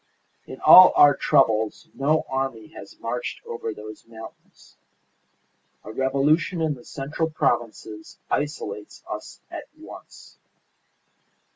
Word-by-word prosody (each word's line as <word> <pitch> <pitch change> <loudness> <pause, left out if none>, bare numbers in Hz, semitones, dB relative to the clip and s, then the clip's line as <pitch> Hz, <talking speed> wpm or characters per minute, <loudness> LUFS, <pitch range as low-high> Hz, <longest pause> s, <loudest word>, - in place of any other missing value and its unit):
In - - -10
all 185 0 +9
our 145 -1 +6
troubles 110 -7 +1
no 150 +3 0
army 130 -5 -4
has 100 - -13
marched 120 +1 -4
over 115 -1 -5
those 110 0 -10
mountains. 110 -1 -14 1.1
A 110 - -9
revolution 140 +8 +1
in 160 -2 0
the 125 -4 -13
central 150 +4 -4
provinces 110 -7 -3
isolates 105 -9 -4
us - - -8
at - - -7
once. - - -14
130 Hz, 110 wpm, -23 LUFS, 110-145 Hz, 1.1 s, all